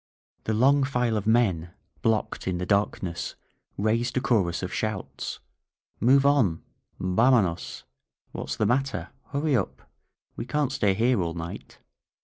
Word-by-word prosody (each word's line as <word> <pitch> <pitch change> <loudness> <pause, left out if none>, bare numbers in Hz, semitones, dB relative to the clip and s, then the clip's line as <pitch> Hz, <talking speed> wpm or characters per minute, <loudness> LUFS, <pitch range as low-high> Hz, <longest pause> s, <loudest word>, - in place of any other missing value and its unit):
The 110 - 0
long 135 +5 +4
file 125 -4 0
of 105 0 -2
men, 95 -8 +2 0.3
blocked 110 -4 0
in 90 -1 0
the 90 - -3
darkness, 95 -3 -1 0.4
raised 115 +5 0
a - - +5
chorus 95 -9 +1
of 95 - -4
shouts: 95 -11 -3 0.6
"Move 135 +4 +5
on! 125 - +3 0.4
Vamonosl 95 -1 +2 0.5
What's - - -4
the - - +1
matter? 135 +2 0 0.2
Hurry 145 0 0
up! 100 - -2 0.5
We - - -5
can't 150 -3 0
stay 105 -8 +2
here 115 0 +2
all 85 -1 -2
night 85 0 -7
110 Hz, 135 wpm, -26 LUFS, 95-130 Hz, 0.6 s, a